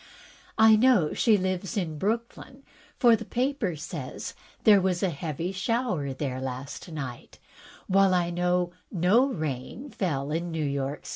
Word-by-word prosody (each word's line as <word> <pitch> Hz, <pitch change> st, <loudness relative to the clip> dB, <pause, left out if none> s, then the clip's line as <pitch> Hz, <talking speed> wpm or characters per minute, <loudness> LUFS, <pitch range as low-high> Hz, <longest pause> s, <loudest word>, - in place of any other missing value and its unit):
I 220 Hz, 0 st, +7 dB
know 215 Hz, -8 st, +4 dB
she 220 Hz, -3 st, +4 dB
lives 185 Hz, +2 st, -2 dB
in 160 Hz, -6 st, -2 dB
Brooklyn, 235 Hz, -, -3 dB, 0.3 s
for 240 Hz, -3 st, +6 dB
the -, -, -6 dB
paper 245 Hz, -, -1 dB
says 150 Hz, -3 st, -6 dB, 0.3 s
there 205 Hz, -3 st, +7 dB
was 185 Hz, -1 st, 0 dB
a 190 Hz, -, +2 dB
heavy 160 Hz, +3 st, -4 dB
shower 195 Hz, -, -1 dB
there 130 Hz, -1 st, -4 dB
last 130 Hz, +6 st, -6 dB
night, 135 Hz, -6 st, -7 dB, 0.5 s
while 195 Hz, -1 st, +4 dB
I 175 Hz, -1 st, +1 dB
know 180 Hz, 0 st, 0 dB, 0.2 s
no 195 Hz, +9 st, +3 dB
rain 155 Hz, -, -5 dB
fell 145 Hz, -7 st, -2 dB
in 170 Hz, +2 st, -2 dB
New 160 Hz, -2 st, -2 dB
York. 140 Hz, 0 st, -3 dB
180 Hz, 145 wpm, -27 LUFS, 150-215 Hz, 0.5 s, I